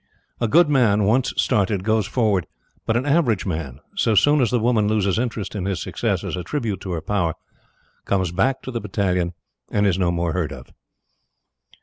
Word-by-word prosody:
A 115 - +1
good 170 +9 +5
man 115 -8 +3
once 120 +6 +2
started, 100 -2 +1
goes 110 -1 +1
forward; 105 -8 +1 0.4
but 110 - +2
an 125 - -1
average 140 - +2
man, 80 -8 -4 0.2
so 115 - +2
soon 145 +8 +4
as 120 - +2
the 125 - +1
woman 110 -2 +2
loses 105 -1 +1
interest 115 -4 -3
in 100 -4 -3
his 95 -3 -1
success - - -2
as - - -3
a 90 - -4
tribute 110 - -3
to 95 - -5
her 80 - -3
power, 85 -5 -1 0.7
comes 95 -3 0
back 95 +9 0
to 130 - -6
the 115 -2 -3
battalion 90 -4 -1 0.3
and 105 0 +1
is 95 -2 +2
no 90 -2 +2
more 85 -1 -1
heard 80 -4 -1
of. 65 -3 -11
105 Hz, 195 wpm, -22 LUFS, 90-115 Hz, 0.7 s, good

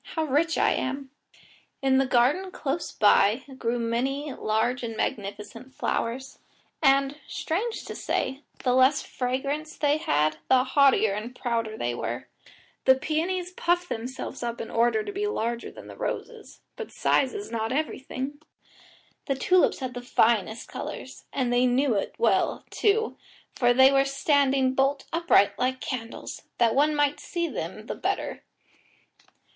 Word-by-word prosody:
How 320 - +1
rich 315 +3 +1
I - - +3
am!" 270 +1 -3 0.7
In 265 -1 +4
the 270 - +2
garden 265 +11 +2
close 315 -2 -3
by 210 +3 +4 0.2
grew 235 0 0
many 260 +5 -1
large 220 +4 0
and 225 -2 -5
magnificent 215 +6 -4
flowers, 260 +3 -3 0.4
and, 275 0 +3
strange 435 +8 -3
to - - -6
say, 265 +2 -2 0.2
the 250 - +2
less 260 +2 +4
fragrance 275 +5 -3
they 295 0 +2
had 155 - +1
the 255 -1 +5
haughtier 265 -6 +4
and 225 +5 -5
prouder 230 -3 -2
they 120 0 -1
were. 120 +1 -4 0.6
The 260 - +7
peonies 345 +6 -2
puffed 355 0 0
themselves 245 +3 -5
up 235 -1 -3
in - - -6
order 240 - +2
to 410 - -5
be 405 +1 -2
larger 235 - -2
than - - -12
the - - -10
roses, - - -6
but 460 - -7
size 265 - +1
is 410 - -6
not 225 0 -2
everything! 285 0 -3 0.9
The 275 - +1
tulips 360 +4 +3
had 255 -1 -3
the 245 - -6
finest 225 -2 +1
colours, - - -7
and 250 -3 0
they 245 +1 +4
knew 255 +1 +2
it 200 - -2
well, 470 - +1
too, 440 +2 +1 0.4
for 245 -1 +3
they 265 +2 +7
were 275 0 +4
standing 275 -1 +2
bolt 275 +1 +1
upright 205 - +3
like 260 +1 0
candles, 235 -4 -6 0.2
that 230 -2 +3
one 300 +2 +3
might 290 0 +1
see 340 -1 -2
them - - -5
the - - -4
better. - - -3
265 Hz, 150 wpm, -26 LUFS, 235-295 Hz, 0.9 s, The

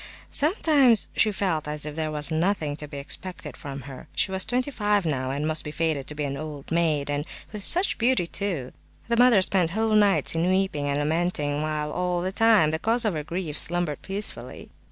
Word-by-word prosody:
Sometimes 290 - +3
she 215 - +3
felt 180 -7 -1
as 150 0 -3
if 150 -1 -6
there 155 -1 -2
was 150 +1 +2
nothing 160 -2 0
to 150 - -8
be 145 -1 -8
expected 150 0 -6
from 140 0 -7
her. 135 0 -10
She - - +1
was 190 0 +2
twenty 250 +4 -1
five 205 -5 +1
now, 130 -4 -1
and 140 +3 -2
must 155 0 0
be 150 - -6
fated 155 -3 -1
to 150 - -8
be 150 - -3
an 140 -1 -3
old 150 -1 -8
maid, 160 -4 +1
and 145 0 -1 0.3
"with 210 -2 -6
such 360 - +3
beauty, 240 -5 +2
too!" 170 -8 -3 0.4
The 235 - +1
mother 240 -5 +6
spent 185 -3 +2
whole 220 +4 0
nights 205 -2 +4
in 165 +2 +1
weeping 185 -6 0
and 140 - 0
lamenting, 150 -1 0
while 150 -1 -2
all 180 0 -1
the 185 - -2
time 215 -7 +4
the 160 - -2
cause 230 +5 +1
of 210 - +1
her 155 -2 -3
grief 165 -1 -4
slumbered 175 -2 +1
peacefully. 200 +2 -5
165 Hz, 210 wpm, -25 LUFS, 150-205 Hz, 0.4 s, mother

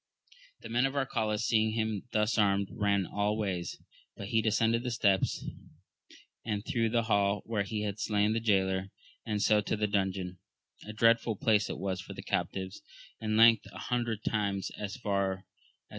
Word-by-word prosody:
The - - -9
men 120 +3 +2
of 135 - -6
Arcalaus 110 -6 -1
seeing 110 -1 +2
him 110 -1 -2
thus 105 +1 +1
armed, 100 -2 +2
ran 100 -3 +1
all 105 +3 -1
ways; 95 -5 -3 0.4
but 100 - -6
he 110 - +3
descended 115 +2 +2
the 125 - -3
steps, 100 -5 +1 1.0
and 105 -1 -3
through 115 -2 0
the 115 +1 +1
hall 100 -2 +1
where 110 -3 -1
he 105 +1 -3
had 105 0 -3
slain 105 -1 +1
the 115 - +1
jaylor, 95 -3 +1 0.4
and 105 -2 0
so 105 -1 +4
to 105 - -2
the 105 - +1
dungeon: 95 -3 -1 0.5
a - - -5
dreadful 115 +1 +3
place 105 0 +2
it - - -4
was 95 -1 -3
for - - -9
the - - -8
captives: 95 0 -3 0.4
in 110 0 -1
length, 115 -2 +6
an 100 - -11
hundred 120 -3 -2
times 100 -3 -1
as 105 +3 -5
far 100 -4 0
aa 95 - -10
a. - - -29
105 Hz, 180 wpm, -30 LUFS, 100-110 Hz, 1.0 s, length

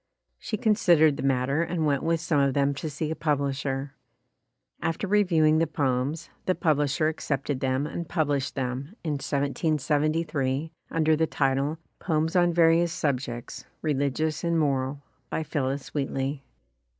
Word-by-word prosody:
She 215 - -3
considered 170 -9 +4
the - - -4
matter 135 +2 +1
and 170 -1 -1
went 140 -2 +1
with 165 0 +1
some 160 -2 +1
of 140 -1 +2
them 140 0 +2
to 155 +3 -4
see 150 +1 -3
a - - -2
publisher. 140 -2 -1 0.9
After 165 +4 -1
reviewing 170 -6 +3
the 165 - +2
poems, 140 +2 -1 0.2
the 185 - +3
publisher 150 -1 +1
accepted 145 -3 -2
them 130 +2 0
and 165 +2 -5
pub 155 -4 0
lished 140 -1 -1
them, 135 +6 -3
in 160 - -1
1773, 150 0 0 0.2
under 160 -1 +2
the 160 +1 +1
title, 140 +2 0 0.2
"Poems 160 0 0
on 175 -1 +4
Various 165 0 +4
Subjects, 130 -6 -3 0.2
Religious 150 +2 0
and 170 -1 +1
Moral, 140 -2 0 0.3
by 160 - -2
Phillis 140 -3 -3
Wheatley". 135 0 -2
150 Hz, 145 wpm, -26 LUFS, 140-160 Hz, 0.9 s, considered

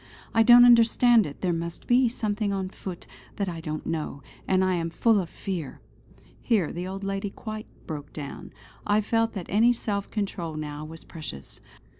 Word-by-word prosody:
I 225 - +5
don't 240 +1 +9
understand 235 -2 +6
it; 145 - -10
there 180 -2 +1
must 170 0 -4
be 245 0 +4
something 215 -3 -1
on 190 -1 -2
foot 185 -2 -8 0.3
that 200 - -2
I 170 -2 -4
don't 155 -1 -5
know; 155 -4 -4 0.2
and 190 0 +3
I 185 - +2
am 165 -2 -1
full 220 +5 +3
of 175 - -7
fear!" 175 -8 -5 0.6
Here 210 -10 +1
the 175 +2 -4
old 195 +1 -6
lady 195 +1 -2
quite 215 +2 -7 0.2
broke 145 -2 -6
down. 145 -2 -8 0.3
I 205 +1 +2
felt 225 +1 +1
that 190 -5 -5
any 230 +5 +4
self 205 -4 -3
control 185 -6 -3
now 150 0 -5
was 160 +1 -9
precious. 155 - -8
195 Hz, 180 wpm, -26 LUFS, 165-220 Hz, 0.6 s, don't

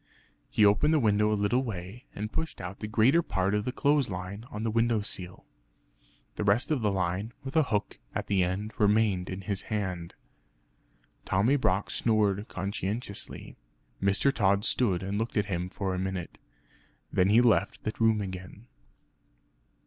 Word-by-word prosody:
He 105 - +4
opened 150 +10 +4
the - - +4
window 105 -3 +3
a 105 - +1
little 105 +5 +2
way, 110 0 -6
and 105 +2 -4
pushed 160 - -3
out 90 +2 -7
the 110 - -4
greater 120 +10 +4
part 95 - -1
of 105 0 0
the 125 - -1
clothes 140 -1 +2
line 95 +4 -6
on 105 - -6
to - - -3
the 115 - 0
window 115 -1 +2
sill. 90 -3 -6 0.9
The - - -1
rest 105 +9 +2
of 145 -5 +1
the 105 - +2
line, 95 +4 -2
with 135 +2 -7
a 160 - +6
hook 105 -2 -1 0.2
at - - -2
the 95 -2 +2
end, 95 +5 -2
remained 105 -3 +2
in 95 +1 -5
his 100 0 -3
hand. 90 -6 -3 1.1
Tommy 105 +9 +2
Brock 100 -7 +1
snored 105 -2 +1
conscientiously. 100 +2 -4 0.4
Mr. 100 +8 +3
Tod 100 -1 +2
stood 95 -8 +1
and 100 +2 -2
looked 115 0 -2
at 105 - +2
him 90 +1 -2
for 95 -1 -3
a 90 - -2
minute; 95 -2 -4 0.7
then 90 +1 +3
he 110 +3 +6
left 120 -2 +2
the 110 - -2
room 110 -2 +3
again. 95 +3 -7
105 Hz, 170 wpm, -29 LUFS, 95-115 Hz, 1.1 s, a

